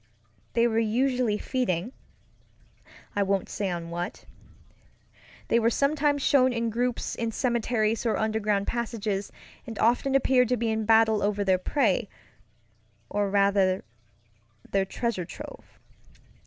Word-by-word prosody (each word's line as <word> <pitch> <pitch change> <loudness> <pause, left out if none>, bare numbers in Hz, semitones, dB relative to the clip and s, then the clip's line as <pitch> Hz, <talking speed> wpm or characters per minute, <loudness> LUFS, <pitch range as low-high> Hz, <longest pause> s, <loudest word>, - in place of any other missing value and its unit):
They 235 0 +3
were 225 -1 +2
usually 240 0 +1
feedingŌĆöI 230 -5 -2 1.3
won't 195 -1 0
say 200 -2 -2
on 170 -1 -5
what. 175 +6 -5 1.2
They 235 - +3
were 230 0 +3
sometimes 285 +2 +1
shown 260 -2 +4
in 230 -1 -1
groups 245 +2 -1
in 230 -1 -2
cemeteries 230 -2 0
or 230 -3 +1
underground 215 -2 0
passages, 220 -4 -3 0.4
and 225 -2 -7
often 245 +4 +2
appeared 255 -2 +3
to 250 - +2
be 230 0 0
in 220 0 -1
battle 220 -1 +4
over 205 0 0
their 190 -2 +2
preyŌĆöor 220 -1 +1 1.0
rather, 200 -2 +2 0.9
their 195 -1 +2
treasure 200 -2 -2
trove. - - -11
225 Hz, 120 wpm, -27 LUFS, 200-245 Hz, 1.3 s, shown